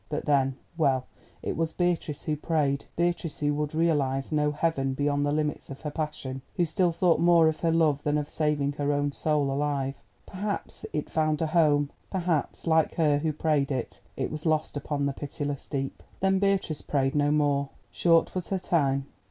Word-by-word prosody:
But, 150 - -3
then—well, 135 -1 +1 0.4
it - - -2
was 165 0 -1
Beatrice 175 -4 -1
who 155 - 0
prayed—Beatrice, 160 +2 -1
who 145 0 +1
could 150 +1 -2
realise 145 -5 +1
no 150 -1 +2
heaven 145 -3 0
beyond 145 +1 +1
the - - +1
limits 150 0 -1
of 135 - -8
her 150 - -4
passion, 145 -4 -4
who 175 - +2
still 170 +2 +1
thought 170 0 +2
more 170 -1 +6
of 160 -1 0
her 165 - +1
love 155 -3 +3
than 150 0 +1
of 150 -1 -2
saving 150 -2 0
her 145 0 +1
own 145 0 0
soul 145 -1 0
alive. 140 -1 -1 0.2
Perhaps 200 +2 -4
it 150 - -2
found 155 -1 +1
a 160 - +1
home—perhaps, 155 +2 0
like 160 -2 +3
her 150 -3 +3
who 155 +1 0
prayed 150 -2 +1
it, 130 -3 -3 0.2
it - - -2
was 155 +2 -3
lost 155 -1 +1
upon 145 0 -2
the 140 - 0
pitiless 145 0 -4
deep. 135 -2 -3 0.2
Then 190 0 +2
Beatrice 195 -6 +1
prayed 135 -1 0
no 145 0 +2
more. 145 -2 +2 0.2
Short 165 -1 +3
was 185 -2 -3
her 195 - 0
time. 140 -7 +1
150 Hz, 180 wpm, -27 LUFS, 145-165 Hz, 0.4 s, more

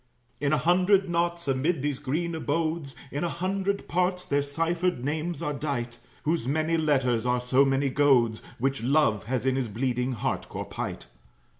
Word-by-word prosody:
In 140 -1 +1
a 155 - +4
hundred 185 +3 +3
knots, 170 -1 0
amid 135 +3 +1
these 145 -3 -1
green 160 +5 -2
abodes, 155 -2 -2 0.2
In 145 - -2
a 170 - 0
hundred 195 +3 -2
parts, 180 0 0
their 145 0 +1
ciphered 165 0 -1
names 155 +2 -2
are 150 - -1
dight; 135 -5 -3 0.2
Whose 155 -5 0
many 155 +4 +1
letters 130 -7 +1
are 125 0 +2
so 125 +2 +3
many 135 0 +1
goads, 130 -6 +3 0.2
Which 135 +1 -1
Love 125 -5 +2
has 125 +1 -2
in 130 -1 +2
his 130 -2 0
bleeding 125 +3 -1
heart 115 - -2
core - - -5
pight. - - -5
145 Hz, 170 wpm, -27 LUFS, 130-170 Hz, 0.2 s, a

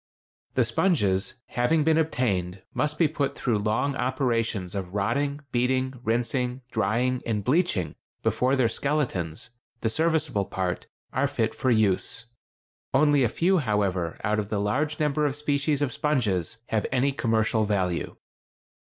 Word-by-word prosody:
The 125 - +3
sponges, 110 - +1
having 150 +6 +2
been 160 +1 +3
obtained, 95 - -1
must 150 0 -1
be 165 - +4
put 140 -2 -2
through 115 -5 0
long 110 +7 0
operations 115 -8 -1
of 95 -1 -5
rotting, 140 +8 0
beating, 130 +2 +1
rinsing, 125 +2 0
drying, 125 +3 +1
and 105 -3 -1
bleaching 125 - +1 0.3
before 130 +2 +2
their 130 -3 +3
skeletons—the 120 - -3
serviceable 155 -7 +1
part—are 95 +9 -3
fit 115 -6 -1
for 130 - -1
use. 110 0 +1 0.7
Only 145 0 +4
a 120 - +3
few, 180 +8 +2
however, 100 - 0
out 105 0 +1
of 105 -1 -3
the 110 - -1
large 145 +9 0
number 150 0 +1
of 140 - -2
species 145 0 0
of 130 -5 -1
sponges 115 - 0
have 110 -2 0
any 135 +2 +2
commercial 110 -3 +1
value. 95 -4 -1
125 Hz, 135 wpm, -26 LUFS, 105-140 Hz, 0.7 s, be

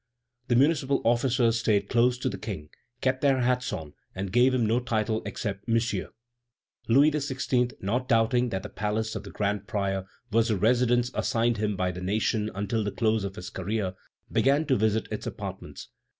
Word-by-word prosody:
The 120 - +2
municipal 140 0 +3
officers 120 -1 +2
stayed 105 -3 +1
close 125 +2 +3
to 125 - -2
the - - -3
King, 95 -9 -6 0.3
kept 130 0 +1
their 135 -2 +3
hats 125 +1 +1
on, 75 -2 -6 0.2
and 95 0 -4
gave 125 +3 +5
him 125 -3 +1
no 115 +3 +2
title 110 -2 -1
except 100 -1 -4
"Monsieur." 115 -4 0 0.8
Louis 140 +7 +5
XVI., 130 -4 0
not 125 +6 -1
doubting 120 +1 +3
that 95 -3 -3
the 105 - -6
palace 110 +1 -2
of - - -3
the - - -8
grand 100 0 -2
prior 95 -3 -1 0.3
was 115 +1 +3
the 110 -4 +1
residence 120 +3 +2
assigned 115 -2 +1
him 105 -1 -1
by 90 -1 0
the 90 0 -7
nation 105 +3 0
until 105 +3 -1
the 105 - -1
close 110 -2 +1
of 100 -1 -4
his 90 -3 -7
career, 95 0 -2 0.4
began 140 +4 +3
to 135 -3 +2
visit 110 0 +1
its - - -4
apartments. - - -7
115 Hz, 180 wpm, -27 LUFS, 105-125 Hz, 0.8 s, gave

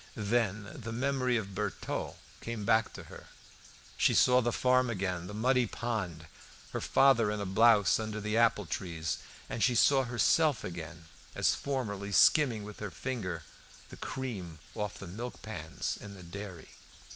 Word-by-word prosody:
Then 105 -2 0
the 120 -7 -7
memory 130 0 +1
of 105 -3 -3
the - - -11
Bertaux 105 0 -3 0.2
came 115 -3 -5
back 110 +2 +3
to - - -8
her. - - -12 0.7
She - - +3
saw 125 0 +5
the 120 0 0
farm 125 +1 +3
again, 90 -5 -2
the 105 - -7
muddy 125 +2 +2
pond, 100 -10 -3 0.5
her - - -3
father 125 -6 +4
in 105 0 -2
a 100 - -2
blouse 105 0 +5
under 110 -1 -3
the 105 +1 -2
apple 115 -3 +3
trees, 80 -1 -3 0.3
and 115 - -2
she 125 -1 +3
saw 135 +3 +5
herself 125 +4 +2
again 85 -1 -7 0.3
as - - +3
formerly, 105 -8 -3
skimming 120 -2 +5
with 105 0 -9
her 105 - -4
finger 110 -2 -4 0.5
the - - -10
cream 100 -11 -5 0.2
off 105 -2 -4
the - - -8
milk 115 +8 -7
pans 80 -7 -4
in 100 0 -9
the 95 - -11
dairy. 95 -1 -8
110 Hz, 165 wpm, -31 LUFS, 95-120 Hz, 0.7 s, saw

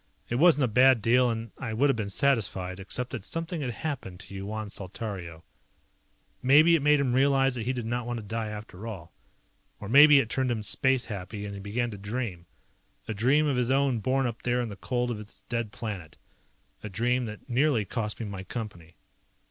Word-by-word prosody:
It 120 - +1
wasn't 160 -3 +5
a - - +3
bad 125 +2 +5
deal 125 +3 +3
and 115 -1 -4
I 115 -4 -4
would 135 +6 +3
have - - -2
been 105 -3 -3
satisfied, 100 -6 0
except 125 +6 -3
that 120 -7 -5
something 165 - -3
had 130 - -2
happened 120 - -5
to 100 - -12
Yuan 105 +2 -5
Saltario. 95 -4 -6 1.0
Maybe 155 +6 +6
it 160 - +1
made 150 +1 +4
him 130 -3 +1
realize 135 0 +3
that 120 -2 -4
he - - +2
did 120 -3 -4
not 120 +1 -2
want 120 0 -2
to 110 - -6
die 115 +1 -3
after 105 0 -8
all. 90 -7 -8 0.7
Or 105 - -7
maybe 145 +5 +8
it 135 - +3
turned 130 +2 -1
him 115 -3 -2
space 130 +4 +1
happy 100 0 -6
and 100 - -6
he 100 - -7
began 115 +5 -2
to 100 - -8
dream. 100 -4 -4 0.6
A 110 - -2
dream 130 +9 +3
of 140 -4 +1
his 125 -1 +1
own 135 -3 +2
born 130 +5 +1
up 115 -1 -4
there 125 0 0
in 120 -2 -2
the 100 - -7
cold 120 +4 -2
of 115 - -3
his 105 0 -11
dead 115 -3 -2
planet. 100 -6 -6 0.6
A 105 - -6
dream 120 +5 0
that 105 -1 -9
nearly 125 -3 +2
cost 105 +1 -3
me 115 - -3
my 100 -2 -6
Company. 95 -6 -7
115 Hz, 210 wpm, -28 LUFS, 105-130 Hz, 1.0 s, maybe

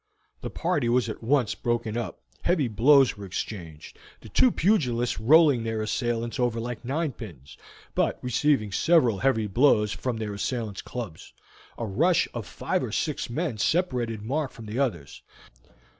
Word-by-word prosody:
The - - -4
party 165 -8 -1
was 120 -1 +2
at - - -6
once 125 -1 +1
broken 120 -2 -2
up, 120 -1 -4 0.2
heavy 170 -7 +1
blows 135 +5 +5
were 100 -1 -8
exchanged, 85 -5 -7 0.2
the 110 - -12
two 255 - +4
pugilists 125 - +1
rolling 145 +2 +5
their 110 -1 -2
assailants 120 +1 -2
over 120 -2 +1
like 120 0 -5
ninepins, 120 - -5 0.4
but - - +1
receiving 125 -3 +1
several 125 - +3
heavy 130 -5 +2
blows 105 -1 +3
from 125 0 -3
their 110 -2 -4
assailants' 110 -1 -3
clubs. 110 -10 -8 0.4
A 115 - -3
rush 155 - +2
of - - -5
five - - -2
or - - -4
six - - -2
men 135 -3 -3
separated 120 - 0
Mark 140 +5 -1
from 115 - -12
the 110 +4 -4
others. 90 - -2
120 Hz, 155 wpm, -26 LUFS, 110-140 Hz, 0.4 s, blows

